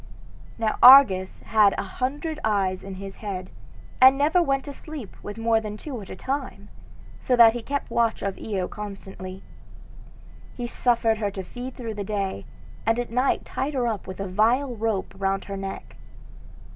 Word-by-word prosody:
Now 220 -1 -1
Argus 230 -8 +7
had 210 -3 +3
a - - -1
hundred 290 - -3
eyes 195 -4 0
in 195 -1 -7
his 195 0 -8
head, 185 -4 -6 0.5
and 260 +1 +8
never 310 +6 +3
went 275 -5 0
to 285 - -7
sleep 285 - -9
with 205 +1 -8
more 225 0 +2
than 210 -1 -6
two 255 -1 -7
at 195 - -11
a - - -7
time, 265 +6 -5 0.5
so 250 - +1
that 230 -2 +7
he 240 - -4
kept 280 +4 -4
watch 230 -1 +1
of 195 -1 -3
Io 195 -4 -3
constantly. 195 -2 -8 1.1
He 245 - -3
suffered 235 -2 +1
her 205 -2 0
to 195 -1 -6
feed 245 +6 -8
through 230 -3 -5
the 205 -1 -4
day, 195 - -3 0.4
and 225 +1 +1
at 245 -1 -3
night 255 +3 +1
tied 280 +2 -3
her 250 -2 +1
up 220 -6 -3
with 185 0 -8
a 195 - -3
vile 235 +7 +1
rope 220 -3 -2
round 195 0 -1
her 200 - -5
neck. 195 0 -7
220 Hz, 180 wpm, -25 LUFS, 195-255 Hz, 1.1 s, and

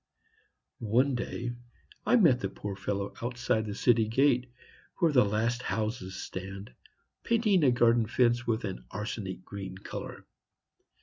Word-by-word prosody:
One 135 +3 +4
day 120 0 -3 0.6
I - - +5
met 165 - +5
the 95 - -2
poor 100 0 -6
fellow 100 0 -3
outside 120 -2 -1
the 100 - -4
city 115 -1 +3
gate, 125 +1 +2 0.5
where 170 -4 +3
the 125 -4 +6
last 110 +4 0
houses 110 -5 -3
stand, 95 -3 -7 0.5
painting 215 -7 +2
a 135 - +6
garden 120 -2 +3
fence 120 +1 +2
with 115 0 0
an 95 - -5
arsenic 100 -3 -5
green 95 -2 -7
color. - - -7
115 Hz, 135 wpm, -29 LUFS, 100-125 Hz, 0.6 s, the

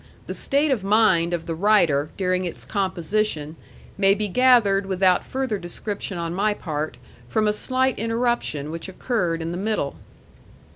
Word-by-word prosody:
The - - -5
state 285 +2 +1
of 230 -7 0
mind 195 -5 +3
of 170 -1 -2
the 165 - -3
writer 165 -6 +3
during 185 -1 0
its 175 - -6
composition 185 -4 -1 0.4
may 195 0 +5
be 210 0 -2
gathered 210 -4 +4
without 185 -1 +3
further 260 -6 -2
description 195 +2 -5
on 170 0 -3
my 205 +3 +1
part 155 -6 -4 0.3
from 215 - +1
a 210 - +2
slight 260 +3 0
interruption 230 - -1
which 165 +3 -5
occurred 180 -5 -1
in 165 - -3
the 175 - -4
middle. 205 -8 -2
195 Hz, 155 wpm, -23 LUFS, 170-215 Hz, 0.4 s, may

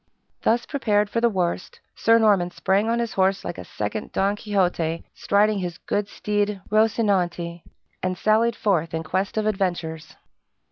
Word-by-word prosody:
Thus 235 +2 +2
prepared 210 -7 0
for 230 - 0
the 235 - +4
worst, 180 -3 -2 0.2
Sir 230 0 +4
Norman 205 -6 +3
sprang 195 +4 +1
on 230 - +1
his 235 -1 -2
horse 190 0 +1
like - - -5
a - - -6
second - - -4
Don 200 +1 +1
Quixote 180 -6 0
striding 210 0 +2
his 175 -2 -4
good 205 -1 -2
steed 205 -1 -1
Rozinante, 190 -6 +1 0.4
and 185 0 -1
sallied 220 +4 +2
forth 165 -8 0
in 160 - -2
quest 190 +6 -2
of 215 - +1
adventures. 175 -6 -2
200 Hz, 155 wpm, -24 LUFS, 175-215 Hz, 0.4 s, the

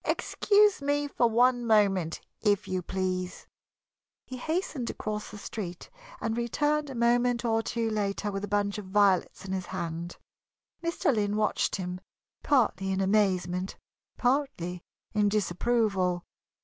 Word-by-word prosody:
"Excuse 415 -4 +3
me 290 +1 0
for 240 -4 +2
one 245 +2 +3
moment, 200 -7 +2 0.2
if 205 -3 +2
you 185 -1 -1
please." 185 0 -3 0.8
He 255 - -7
hastened 310 -3 -2
across 210 0 -4
the - - -9
street 185 -4 -6 0.3
and 225 - -1
returned 295 +5 0
a 270 - -6
moment 240 +1 +2
or 225 -1 +2
two 230 0 -2
later 205 -1 -1
with 195 0 -4
a - - -2
bunch 205 0 0
of 205 - -8
violets 195 -1 +2
in 190 - -5
his 185 -2 -3
hand. 170 -1 -4 0.7
Mr. 335 -4 +1
Lynn 205 -1 0
watched 215 0 +1
him, 180 -1 -4 0.4
partly 210 -8 +2
in 190 - 0
amazement, 190 -2 +1 0.4
partly 245 -10 0 0.3
in 210 -1 +3
disapproval. 195 -2 +1
210 Hz, 135 wpm, -28 LUFS, 185-240 Hz, 0.8 s, Excuse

